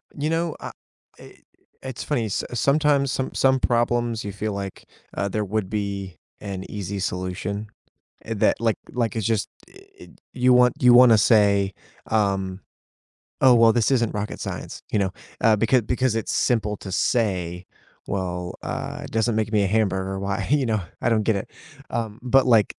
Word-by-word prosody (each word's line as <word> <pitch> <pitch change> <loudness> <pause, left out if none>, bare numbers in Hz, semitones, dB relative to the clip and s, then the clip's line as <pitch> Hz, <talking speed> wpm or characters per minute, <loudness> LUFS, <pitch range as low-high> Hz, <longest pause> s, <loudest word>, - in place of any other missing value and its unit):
You 150 +2 -2
know, 165 0 -1
uh, - - -7 0.5
i - - -14 0.5
it's 130 -2 -6
funny, 130 -7 -1
s 105 - -2
sometimes 140 +2 +2
some 130 - -3
some 130 0 +3
problems 120 -2 0
you 100 - -4
feel 105 +2 -3
like, 100 -1 -6 0.3
uh, 100 - -1
there 105 +1 -2
would 100 -1 -2
be 100 -3 -4 0.2
an 95 -2 -5
easy 100 -1 -5
solution, 95 +3 -3 0.6
eh, 115 - -3
that - - +2
like 115 -1 +1
like 120 -1 -1
it's 110 -3 -2
just, 110 -3 0 0.2
eh, - - -21 0.2
it - - -15
you 125 0 +4
want 125 0 +5
you 125 -1 +7
wanna 120 -2 +8
say, 100 -3 +3 0.3
um, 95 -3 0 0.8
"Oh 130 -2 +7
well, 115 -1 +6
this 120 +1 +2
isn't 120 -4 +1
rocket 105 0 -4
science," - - -6
you - - +1
know, 95 -2 0 0.3
uh, 110 -1 +4
becau 115 +1 +2
because 125 -1 0
it's 115 - -2
simple 105 -4 +1
to 95 - -8
say, 90 -5 0 0.4
"Well, 90 -2 -3
uh, - - -5
it - - -9
doesn't 115 0 +1
make 110 -1 -1
me 105 -2 +3
a - - +1
hamburger, 95 -2 0
why, 100 +1 -2
you 145 -1 +2
know?" 110 -3 0 0.2
I - - +2
don't 110 -2 +2
get 110 0 +1
it, 95 - -7 0.4
um, 110 -2 -3
but 130 +2 +3
like 115 -4 +4
110 Hz, 180 wpm, -23 LUFS, 100-120 Hz, 0.8 s, wanna